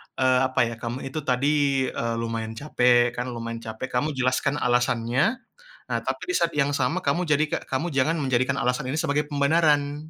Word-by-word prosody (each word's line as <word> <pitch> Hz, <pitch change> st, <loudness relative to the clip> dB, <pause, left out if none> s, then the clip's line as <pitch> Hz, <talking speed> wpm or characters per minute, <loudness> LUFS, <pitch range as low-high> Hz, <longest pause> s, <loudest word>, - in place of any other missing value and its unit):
eee, 130 Hz, -1 st, +3 dB
apa 130 Hz, -, -3 dB
ya, -, -, -6 dB
kamu 120 Hz, +3 st, -5 dB
itu 145 Hz, +4 st, -4 dB
tadi, 140 Hz, 0 st, +1 dB
eee, 115 Hz, 0 st, -2 dB
lumayan 115 Hz, -1 st, -4 dB
capek 125 Hz, -3 st, +3 dB
kan, 125 Hz, +1 st, -3 dB
lumayan 115 Hz, -1 st, -5 dB
capek 110 Hz, +2 st, -6 dB
kamu 145 Hz, +4 st, -1 dB
jelaskan 130 Hz, +2 st, +1 dB
alasannya. 125 Hz, -, +1 dB, 0.5 s
Nah, -, -, 0 dB
tapi -, -, -3 dB
di 370 Hz, -, -1 dB
saat 170 Hz, -, +1 dB
yang 145 Hz, -1 st, +1 dB
sama 125 Hz, -2 st, 0 dB
kamu 170 Hz, +6 st, 0 dB
jadi 150 Hz, -1 st, +2 dB
ka -, -, -1 dB
kamu 135 Hz, +6 st, -2 dB
jangan 155 Hz, +2 st, +1 dB
menjadikan 130 Hz, 0 st, 0 dB
alasan 125 Hz, +1 st, -1 dB
ini 155 Hz, -, 0 dB
sebagai 150 Hz, -2 st, 0 dB
pembenaran. 145 Hz, 0 st, +2 dB
130 Hz, 185 wpm, -25 LUFS, 125-145 Hz, 0.5 s, eee